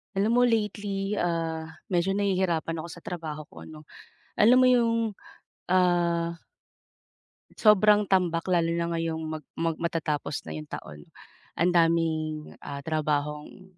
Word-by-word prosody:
Alam 200 Hz, +3 st, +2 dB
mo -, -, +5 dB
lately, 205 Hz, -3 st, -1 dB
ah, 165 Hz, -2 st, -1 dB, 0.2 s
medyo 180 Hz, +1 st, +1 dB
nahihirapan 185 Hz, -5 st, 0 dB
ako 160 Hz, -, -5 dB
sa 175 Hz, -, -10 dB
trabaho 160 Hz, -4 st, -6 dB
ko -, -, -12 dB
'no. 155 Hz, -1 st, -11 dB, 0.5 s
Alam 235 Hz, +4 st, +5 dB
mo 255 Hz, -, +6 dB
'yung 230 Hz, -3 st, +2 dB, 0.6 s
ah 170 Hz, -2 st, +2 dB, 1.2 s
Sobrang 210 Hz, -1 st, +5 dB
tambak 180 Hz, -3 st, +1 dB
lalo 170 Hz, -2 st, +2 dB
na 170 Hz, 0 st, -1 dB
ngayong 165 Hz, -1 st, -2 dB
mag 155 Hz, -1 st, -5 dB
mag 165 Hz, -1 st, -2 dB
matatapos 155 Hz, -4 st, -2 dB
na 80 Hz, -, -5 dB
'yung 75 Hz, -, -7 dB
taon. 75 Hz, -1 st, -9 dB, 0.5 s
Ang 175 Hz, -, +2 dB
daming, 160 Hz, -2 st, +1 dB, 0.2 s
ah, 140 Hz, 0 st, -6 dB
trabahong 150 Hz, +4 st, -3 dB
170 Hz, 130 wpm, -27 LUFS, 160-195 Hz, 1.2 s, mo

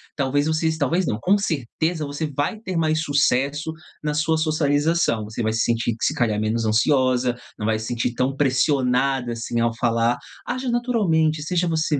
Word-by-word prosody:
talvez 145 Hz, 0 st, +1 dB
vocês 160 Hz, 0 st, 0 dB
talvez 165 Hz, +5 st, +1 dB
não, 105 Hz, -, 0 dB
com 195 Hz, -, +3 dB
certeza 160 Hz, 0 st, -2 dB
você 145 Hz, +2 st, -3 dB
vai 145 Hz, -, -2 dB
ter 190 Hz, -5 st, -4 dB
mais 155 Hz, -1 st, +1 dB
sucesso 145 Hz, +1 st, +1 dB, 0.3 s
na 150 Hz, -1 st, -1 dB
sua 155 Hz, +2 st, +1 dB
socialização. 155 Hz, -4 st, +1 dB
Você 110 Hz, +3 st, -5 dB
vai 110 Hz, -1 st, 0 dB
se 115 Hz, -, 0 dB
sentir, 115 Hz, -1 st, 0 dB
que -, -, -1 dB
se -, -, +1 dB
calhar, 110 Hz, -4 st, 0 dB
menos 110 Hz, +1 st, 0 dB
ansiosa, 125 Hz, +2 st, +2 dB, 0.2 s
não 105 Hz, -, -4 dB
vai 110 Hz, 0 st, +1 dB
se 110 Hz, -, -6 dB
sentir 120 Hz, 0 st, -1 dB
tão 130 Hz, +2 st, -1 dB
pressionada, 135 Hz, -2 st, +1 dB
assim, 115 Hz, 0 st, -3 dB
ao 115 Hz, 0 st, +1 dB
falar. 115 Hz, 0 st, +1 dB, 0.3 s
Aja 255 Hz, +1 st, -3 dB
naturalmente, 195 Hz, -11 st, +1 dB
seja 175 Hz, +2 st, 0 dB
você 160 Hz, -3 st, 0 dB
145 Hz, 180 wpm, -22 LUFS, 120-160 Hz, 0.3 s, com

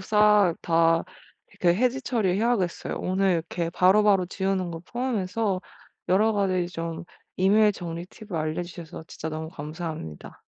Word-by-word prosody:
싹 210 Hz, -3 st, +4 dB
다 165 Hz, 0 st, +3 dB, 0.5 s
이렇게 175 Hz, -1 st, +2 dB
해지 255 Hz, +2 st, +1 dB
처리 225 Hz, -7 st, 0 dB
해야겠어요. 215 Hz, -6 st, 0 dB
오늘 190 Hz, +1 st, +1 dB
이렇게 170 Hz, 0 st, -1 dB
바로바로 195 Hz, +1 st, +4 dB
지우는 190 Hz, -1 st, -1 dB
거 165 Hz, -, -6 dB
포함해서 210 Hz, -3 st, -2 dB, 0.5 s
여러 210 Hz, +4 st, +4 dB
가지 185 Hz, -4 st, +1 dB
좀 165 Hz, -1 st, -5 dB, 0.3 s
이메일 210 Hz, +3 st, +4 dB
정리 170 Hz, -2 st, -6 dB
팁을 210 Hz, -1 st, -11 dB
알려 155 Hz, +2 st, -1 dB
주셔서 170 Hz, -1 st, -9 dB
진짜 160 Hz, -, -6 dB
너무 160 Hz, 0 st, -5 dB
감사합니다. 155 Hz, -, -7 dB
185 Hz, 325 characters per minute, -26 LUFS, 165-210 Hz, 0.5 s, 싹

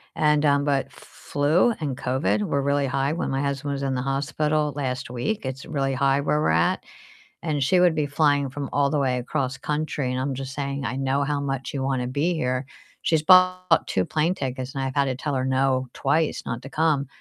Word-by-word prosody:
and, 150 Hz, -1 st, +3 dB
um 140 Hz, -1 st, +3 dB
but 140 Hz, -2 st, +1 dB
f 140 Hz, -, -24 dB
f -, -, -16 dB, 0.2 s
flu 155 Hz, +11 st, +3 dB
and 140 Hz, -5 st, -2 dB
COVID 105 Hz, -5 st, 0 dB
were 140 Hz, +6 st, 0 dB
really 140 Hz, 0 st, +1 dB
high 135 Hz, +2 st, 0 dB
when 165 Hz, -, -2 dB
my 135 Hz, 0 st, -1 dB
husband 140 Hz, 0 st, -2 dB
was 140 Hz, 0 st, -4 dB
in 135 Hz, -1 st, -1 dB
the 125 Hz, -, -1 dB
hospital 150 Hz, +2 st, 0 dB
last 130 Hz, -2 st, -3 dB
week, 125 Hz, -, -3 dB
it's 130 Hz, +1 st, -5 dB
really 135 Hz, -3 st, -1 dB
high 135 Hz, +1 st, +2 dB
where 150 Hz, +1 st, +1 dB
we're -, -, +2 dB
at, 80 Hz, +2 st, +2 dB, 0.6 s
and 155 Hz, -4 st, -1 dB
she 180 Hz, +7 st, +3 dB
would 180 Hz, -2 st, +5 dB
be 150 Hz, -1 st, +1 dB
flying 145 Hz, -1 st, +2 dB
from 140 Hz, +1 st, -5 dB
all 140 Hz, -1 st, +2 dB
the 150 Hz, -, 0 dB
way 130 Hz, -2 st, +1 dB
across 130 Hz, +1 st, -2 dB
country, 150 Hz, -2 st, -2 dB
and 130 Hz, 0 st, -1 dB
I'm 135 Hz, +1 st, -1 dB
just 135 Hz, 0 st, -6 dB
saying, 140 Hz, -1 st, -3 dB
"I 125 Hz, -, -2 dB
know 135 Hz, +1 st, 0 dB
how 145 Hz, 0 st, -1 dB
much 135 Hz, +1 st, -3 dB
you 135 Hz, -2 st, -2 dB
wanna 130 Hz, -2 st, -1 dB
be 145 Hz, +7 st, 0 dB
here." 130 Hz, -4 st, -1 dB, 0.4 s
She's 160 Hz, -2 st, +2 dB
bought 185 Hz, +1 st, +5 dB
2 95 Hz, -, 0 dB
plane 160 Hz, +3 st, +1 dB
tickets, 130 Hz, -2 st, -4 dB
and 135 Hz, -, -3 dB
I've 130 Hz, 0 st, -3 dB
had 140 Hz, -1 st, +3 dB
to 130 Hz, -2 st, -1 dB
tell 145 Hz, +2 st, -3 dB
her 130 Hz, -, 0 dB
no 130 Hz, 0 st, +1 dB
twice 150 Hz, +3 st, 0 dB
not 115 Hz, 0 st, -4 dB
to 135 Hz, -, -9 dB
come 150 Hz, -3 st, +1 dB
140 Hz, 225 wpm, -24 LUFS, 130-150 Hz, 0.6 s, would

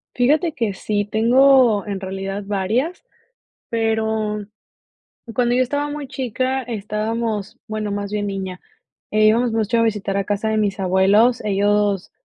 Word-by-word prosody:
Fíjate 300 Hz, +7 st, +2 dB
que 230 Hz, -6 st, -1 dB
sí 205 Hz, +1 st, -1 dB
tengo 235 Hz, 0 st, +4 dB
en 200 Hz, -2 st, -4 dB
realidad 195 Hz, +1 st, -4 dB
varias, 220 Hz, -, -1 dB, 0.7 s
pero 220 Hz, -2 st, -1 dB, 0.9 s
cuando 245 Hz, 0 st, +1 dB
yo 255 Hz, -, +3 dB
estaba 285 Hz, +3 st, -1 dB
muy 290 Hz, -1 st, -5 dB
chica 260 Hz, 0 st, -2 dB
estábamos 215 Hz, -1 st, -3 dB
bueno, 215 Hz, -1 st, -3 dB
más 200 Hz, 0 st, -4 dB
bien 205 Hz, -1 st, -2 dB
niña, 190 Hz, -2 st, -5 dB, 0.5 s
eh, 215 Hz, 0 st, +4 dB
íbamos 230 Hz, +2 st, +3 dB
mucho 225 Hz, +1 st, +1 dB
a -, -, +4 dB
visitar 205 Hz, -3 st, -1 dB
a 200 Hz, -, +1 dB
casa 205 Hz, +2 st, -1 dB
de 220 Hz, -, 0 dB
mis 205 Hz, -1 st, 0 dB
abuelos. 195 Hz, +6 st, +3 dB
Ellos 205 Hz, -1 st, +1 dB
215 Hz, 140 wpm, -20 LUFS, 205-240 Hz, 0.9 s, tengo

